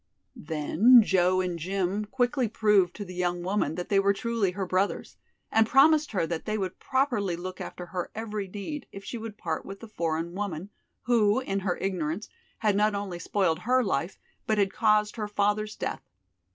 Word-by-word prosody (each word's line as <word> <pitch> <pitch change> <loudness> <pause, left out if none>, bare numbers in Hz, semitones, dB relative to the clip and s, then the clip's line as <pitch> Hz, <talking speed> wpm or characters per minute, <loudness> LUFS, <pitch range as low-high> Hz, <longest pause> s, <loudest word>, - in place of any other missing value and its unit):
Then 175 +10 +5
Joe 185 -2 +3
and 180 -2 -3
Jim 195 +4 -1
quickly 245 +2 0
proved 210 -4 +2
to 205 - -6
the 185 - -9
young 175 -1 -1
woman 185 -5 0
that 180 0 -5
they 200 - +4
were 200 0 +3
truly 230 -2 0
her 195 0 -3
brothers, 185 +2 -1 0.4
and 220 0 +4
promised 300 +4 +5
her 185 - +1
that 165 -1 -4
they 215 0 -1
would 185 -3 -4
properly 245 -9 0
look 185 +2 -7
after 180 - -7
her 180 0 -4
every 210 -2 -4
need 210 +10 -6
if 195 0 -10
she 235 - -5
would 220 -2 -7
part 160 -2 -3
with 195 0 -9
the 230 - -10
foreign 165 -4 -2
woman, 195 -1 -4 0.3
who, 220 -2 +3
in 195 -7 -2
her 185 -2 -1
ignorance, 180 0 -3 0.3
had 210 -2 +1
not 210 +1 +2
only 195 -3 -4
spoiled 175 -3 0
her 255 +2 +2
life, 185 -2 -1 0.3
but 215 - +2
had 200 -2 +2
caused 210 0 +2
her 210 -2 -2
father's 210 +1 0
death. - - -4
200 Hz, 190 wpm, -27 LUFS, 180-215 Hz, 0.4 s, Then